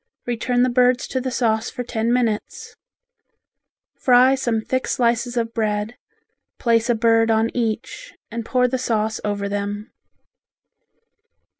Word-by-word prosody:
Return 245 +1 0
the 255 - +2
birds 250 0 +2
to 260 - -2
the 260 - -2
sauce 230 -2 0
for 250 - -5
ten 230 -1 -1
minutes. 235 -4 -2 1.2
Fry 255 +1 +5
some 240 -4 0
thick 260 +3 -2
slices 240 0 0
of 230 -1 -1
bread, 215 0 -1 0.6
place 230 0 +1
a 240 - +3
bird 225 0 +3
on 225 +1 +1
each 240 - -3 0.2
and 230 0 -4
pour 250 +2 +2
the 260 +1 -2
sauce 220 -3 -1
over 205 -1 -2
them. 205 +1 -4
235 Hz, 135 wpm, -21 LUFS, 220-250 Hz, 1.2 s, Fry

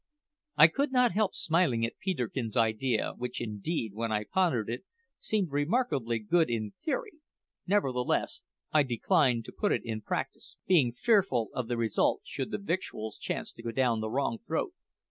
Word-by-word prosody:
I 150 - +10
could 275 - -1
not 250 -2 +4
help 205 +1 +1
smiling 155 -9 +2
at 115 - -7
Peterkin's 125 - -2
idea, 115 +1 +1
which 125 0 -4
indeed, 110 - -3
when 115 +1 -2
I 105 0 0
pondered 135 - +1
it, 120 +7 -4 0.4
seemed 200 -7 0
remarkably 145 - +1
good 160 +10 +2
in 110 -3 -2
theory; 420 0 -3 0.5
nevertheless, 135 -11 +1 0.3
I 155 - +5
declined 130 - +2
to - - -8
put 205 - 0
it - - +1
in 110 -2 -3
practice, - - -4
being 155 -10 +4
fearful 130 - +2
of 125 -3 -3
the 120 - -1
result 115 -3 +1
should 135 - -4
the - - -2
victuals 170 - -3
chance - - -3
to - - -12
go 115 - -4
down 120 -1 +1
the 110 - -2
wrong 120 -2 -1
throat. - - -2
125 Hz, 165 wpm, -30 LUFS, 115-175 Hz, 0.5 s, I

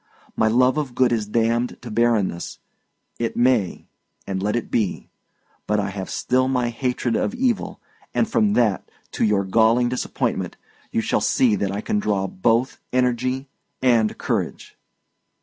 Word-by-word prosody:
My 110 - +2
love 125 +5 +3
of 135 -5 -4
good 125 -2 +3
is 110 -3 0
damned 115 +2 0
to 120 - -7
barrenness; 110 -6 0 0.6
it 115 -1 -2
may, 120 -6 +2 0.4
and 95 -1 -3
let 105 +2 0
it 120 - -3
be! 105 -5 -1 0.6
But 105 0 +1
I 100 -1 -1
have 95 -1 -6
still 130 +1 +1
my 125 -2 +1
hatred 125 -1 -1
of - - -1
evil; 245 -3 -1 0.3
and 230 - +1
from 215 -2 +2
that, 110 - +1 0.2
to - - -1
your 105 -2 +3
galling 115 +5 +3
disappointment, 125 - -2 0.3
you - - +1
shall - - 0
see 120 -5 +3
that 100 -1 -1
I 100 +1 -3
can 105 - 0
draw 100 -2 0
both 115 +7 0
energy 125 +2 0 0.3
and 115 -4 +2
courage." - - -3
120 Hz, 155 wpm, -22 LUFS, 105-125 Hz, 0.6 s, love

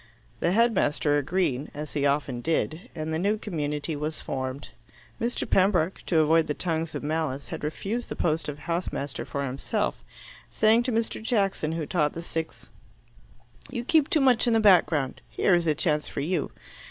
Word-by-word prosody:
The 170 - +1
headmaster 170 -10 +2
agreed, 145 -3 -1
as 150 +1 -6
he 145 -1 +2
often 140 -3 0
did, 160 +2 -1
and 155 0 -3
the 160 - 0
new 205 +4 +1
community 150 -6 -3
was 150 +2 -3
formed. 130 +2 -4 0.5
Mr. 235 +2 -1
Pembroke, 185 -2 +2
to 170 - +2
avoid 160 +1 +4
the 150 - -1
tongues 165 -2 -2
of - - -4
malice, 150 -3 -2
had - - -6
refused 200 +10 -3
the - - -4
post 160 -2 0
of 145 - -5
house 170 +3 -2
master 140 -1 -4
for 140 0 -3
himself, 140 - -2 0.5
saying 220 +2 +4
to 250 +1 -1
Mr. 225 -1 -1
Jackson, 195 -8 0
who 165 -2 -2
taught 150 -2 +1
the 165 - -6
sixth, 160 -8 -5 1.0
"You 240 -2 -4
keep 310 +1 +3
too 310 - +3
much 255 -2 +4
in 235 - +3
the 225 - +4
background. 170 -10 +3
Here 190 - +2
is 175 -1 +2
a 155 - +3
chance 150 -2 +1
for - - -4
you." 160 +1 -1
160 Hz, 180 wpm, -26 LUFS, 150-195 Hz, 1.0 s, avoid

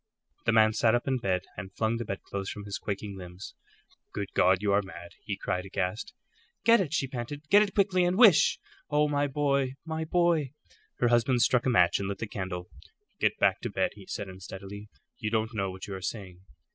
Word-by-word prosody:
The - - +5
man 110 -1 +5
sat 110 +1 +3
up 120 - -2
in 130 -1 +1
bed 95 -5 0
and 95 +1 -7
flung 110 +1 0
the 120 - -4
bedclothes 100 0 -5
from 105 -1 -7
his 100 -1 -4
quaking 100 0 -4
limbs. 90 +1 -9 0.6
"Good 100 -1 -4
God, 95 0 +4
you 100 -1 +2
are 100 - +4
mad!" 95 +1 -10
he 100 -2 -3
cried, 90 -2 -2
aghast. 95 +1 -3 0.5
"Get 230 -2 +6
it," 160 -7 -3
she 155 - +1
panted; 130 +3 -6
"get 205 +1 +7
it 205 -2 -1
quickly, 190 -3 +3
and 175 +1 +1
wish 215 -9 +6 0.3
Oh, 150 0 +3
my 145 0 +1
boy, 140 -2 0
my 160 0 -3
boy!" 165 -5 +1 0.4
Her 120 - +2
husband 120 +1 +3
struck 125 +2 +2
a - - +4
match 90 -8 +4
and 100 - -3
lit 100 - -3
the 115 - -4
candle. 95 -4 -5 0.5
"Get - - +1
back - - +2
to - - -3
bed," - - 0
he 100 -2 -14
said, 100 - -4
unsteadily. 95 +2 -9 0.3
"You 110 -4 -2
don't 110 +1 -1
know 100 -3 -1
what 95 0 -7
you 100 - -7
are 95 - -6
saying." 90 -2 -6
110 Hz, 210 wpm, -28 LUFS, 95-140 Hz, 0.6 s, get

